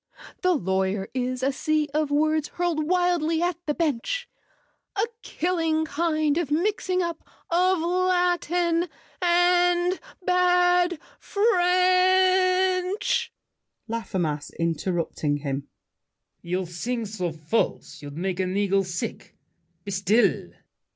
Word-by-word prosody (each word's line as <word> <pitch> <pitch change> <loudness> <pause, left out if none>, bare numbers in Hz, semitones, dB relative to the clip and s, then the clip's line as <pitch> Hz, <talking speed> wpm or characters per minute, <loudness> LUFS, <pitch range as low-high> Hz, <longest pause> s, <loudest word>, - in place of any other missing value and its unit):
"The 365 -1 +3
lawyer 190 - -1
is 255 0 -2
a 270 - +2
sea 305 +2 0
of 305 -1 0
words 310 +1 +1
Hurled 335 -4 -1
wildly 350 -3 +2
at 350 -2 0
the 295 - 0
bench. 335 - -1 0.7
A 415 +1 +2 0.2
killing 325 -2 -1
kind 310 0 0
of 335 -5 -2
mixing 365 +3 0
up 340 -1 -4 0.3
Of 365 +2 +3
Latin 355 -1 +1 0.3
and 355 +1 +3 0.3
bad 360 -1 +3 0.2
French—" 370 -1 +2 0.6
LAFFEMAS 180 -10 -3
(interrupting 165 -3 -1
him). 140 -1 -4 0.7
You 180 +2 -2
sing 225 +8 -3
so 190 -5 -3
false, 160 +2 -2
you'd 145 0 -9
make 185 +1 -2
an 185 +1 -1
eagle 195 -1 +2
sick. 180 -2 -6 0.5
Be 200 - -5
still! 200 +5 +2
320 Hz, 105 wpm, -25 LUFS, -, 0.7 s, The